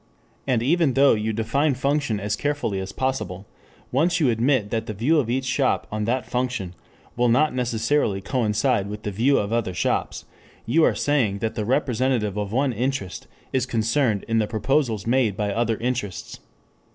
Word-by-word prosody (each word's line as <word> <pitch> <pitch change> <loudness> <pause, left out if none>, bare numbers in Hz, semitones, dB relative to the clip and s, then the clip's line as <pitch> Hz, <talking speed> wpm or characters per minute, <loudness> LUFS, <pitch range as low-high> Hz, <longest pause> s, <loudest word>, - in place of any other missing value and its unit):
And 120 -4 +1
even 155 0 +2
though 140 +1 +6
you 110 0 -1
define 125 +7 0
function 140 -4 0
as 105 +1 -1
carefully 145 -8 -2
as 95 0 -5
possible, 105 -7 -3 0.5
once 165 +6 +2
you 140 -6 +3
admit 115 -2 +1
that 115 -1 -2
the 110 - -4
view 145 +10 +2
of 120 -6 -1
each 130 +2 -1
shop 130 +1 +1
on 105 0 -2
that 120 +1 -1
function 125 -6 -2 0.4
will 120 0 +2
not 150 +6 +3
necessarily 120 -2 0
coincide 105 -2 0
with 105 +1 -7
the 105 - -3
view 120 +8 +2
of 100 +2 -1
other 110 -6 -1
shops, - - -1 0.4
you 155 +8 +3
are - - +3
saying 125 -9 +1
that 110 +2 -2
the 110 -3 -3
representative 125 -4 0
of 105 -1 -3
one 130 +2 +1
interest 115 - -3 0.3
is 130 -1 +1
concerned 115 -1 0
in 115 -1 +1
the 105 - +1
proposals 115 -1 0
made 115 -4 +1
by 105 -2 -1
other 115 0 0
interests. 120 -6 -4
115 Hz, 175 wpm, -23 LUFS, 105-135 Hz, 0.5 s, though